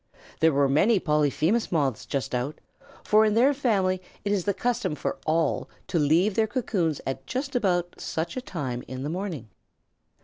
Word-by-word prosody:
There 160 0 +5
were 140 -1 +3
many 190 - +4
Polyphemus 155 - +1
Moths 140 -9 0
just 135 -1 -3
out, 125 +4 -2 0.4
for 215 +1 +5
in 215 -1 +2
their 260 +5 +5
family 195 -9 +1 0.2
it 200 - 0
is 195 -4 0
the 200 - +2
custom 205 -7 -1
for - - -3
all 160 +1 +1 0.2
to 170 - 0
leave 165 +8 +3
their 220 +2 +2
cocoons 200 - -1
at 135 0 -4
just 265 +1 -3
about 175 -6 0
such 165 +1 -3
a 255 - -3
time 130 - -4
in 130 0 -6
the 145 - -3
morning. 170 - -4
175 Hz, 175 wpm, -26 LUFS, 145-210 Hz, 0.4 s, There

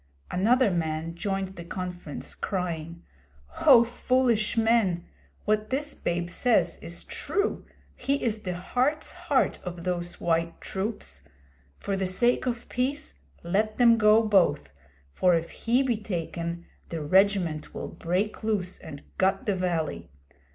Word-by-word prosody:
Another 230 +4 +3
man 160 -1 -2
joined 195 +1 -3
the 170 - -6
conference, 180 -3 -6
crying: 170 -3 -4 0.6
'O 250 -5 +9
foolish 240 -2 +1
men! 220 -6 +2 0.4
What 215 0 +1
this 290 +3 -1
babe 175 0 -2
says 245 +6 +2
is - - -8
true. 405 +1 -1 0.3
He 275 - 0
is 220 -2 0
the 180 -4 -4
heart's 255 - 0
heart - - +1
of 175 -1 -6
those 175 -1 -3
white 165 0 0
troops. 190 - -4 0.6
For 200 - -2
the 190 -1 0
sake 240 +7 +2
of 240 -1 -3
peace 280 +5 -2 0.2
let 210 +5 0
them 235 -2 +6
go 215 +1 +6
both, 180 - +2 0.4
for 180 - +3
if 165 0 -2
he 245 +4 +1
be 245 -4 +1
taken, 170 -4 -4 0.2
the 165 -2 -4
regiment 185 -2 +2
will - - -4
break 185 +7 -2
loose 200 -4 -1
and 145 -2 -9 0.2
gut 190 +1 +2
the 205 - +2
valley. 160 - -2
190 Hz, 135 wpm, -27 LUFS, 170-225 Hz, 0.6 s, O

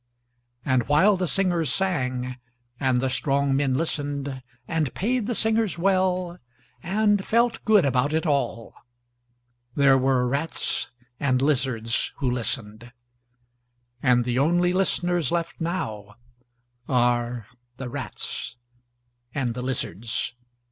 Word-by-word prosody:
And 130 -3 +1
while 175 +8 +5
the 180 -1 -1
singers 175 -5 +1
sangand 130 -9 -1 0.6
the 130 - +1
strong 135 +1 +1
men 135 -2 +1
listenedand 140 -1 -3
paid 235 +2 0
the 240 - -1
singers 220 -4 +1
welland 185 - 0
felt 235 +2 +1
good 210 -6 +5
about 135 +2 +1
it 160 +2 0
all, 125 -6 -1 1.0
there 135 -2 +5
were 130 -1 +2
rats 140 +6 -1 0.3
and 130 -3 +2
lizards 130 -5 0
who 130 -3 -1
listened… 115 -1 -3 1.1
and 125 -2 +3
the 125 +1 0
only 175 +5 +3
listeners 175 -4 +1
left 170 0 -2
now… 110 - -4 0.7
are… 120 -2 +1 0.3
the 130 - -5
rats… 120 - -5 0.8
and 130 -4 -1
the 125 - -5
lizards. 120 -4 -2
140 Hz, 105 wpm, -25 LUFS, 125-175 Hz, 1.1 s, while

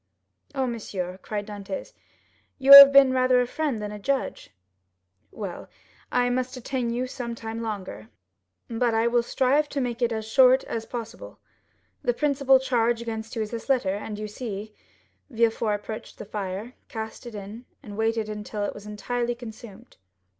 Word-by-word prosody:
"Oh, 265 -1 +1
monsieur," 195 -6 -5
cried 205 0 -4
Dantès, 210 - -7 0.6
"you 275 0 +7
have 280 0 +13
been 275 -2 +6
rather 255 -1 +3
a 250 - +2
friend 280 -2 -2
than 210 0 -5
a 210 - -7
judge." 275 +5 -2 0.8
0105m - - -20
"Well, 195 -5 -6 0.4
I 245 0 +2
must 255 +1 -2
detain 255 -1 -3
you 240 +2 -1
some 245 -2 -5
time 225 0 -6
longer, 185 - -6 0.6
but 230 0 0
I 225 +1 +2
will 235 0 +3
strive 275 +5 +1
to 285 - -3
make 245 -2 -3
it 240 -1 +2
as 220 -1 -3
short 260 +2 +5
as 225 -1 -5
possible. 240 - -7 0.6
The - - 0
principal 275 -3 +3
charge 240 -3 +1
against 225 -1 -6
you 225 - -1
is 210 - -7
this 230 +3 -7
letter, 240 -8 +2
and 210 +1 -5
you 215 0 -5
see——" 210 -1 -6 0.6
Villefort 225 -3 +1
approached 215 +1 -8
the - - -8
fire, 205 +3 -5 0.2
cast 220 +2 -7
it 235 - -9
in, 210 +4 -8 0.2
and 205 -5 -9
waited 225 0 0
until 210 0 -5
it - - -2
was 205 0 -11
entirely 240 +3 -2
consumed. 230 -1 -12
230 Hz, 170 wpm, -25 LUFS, 210-255 Hz, 0.8 s, have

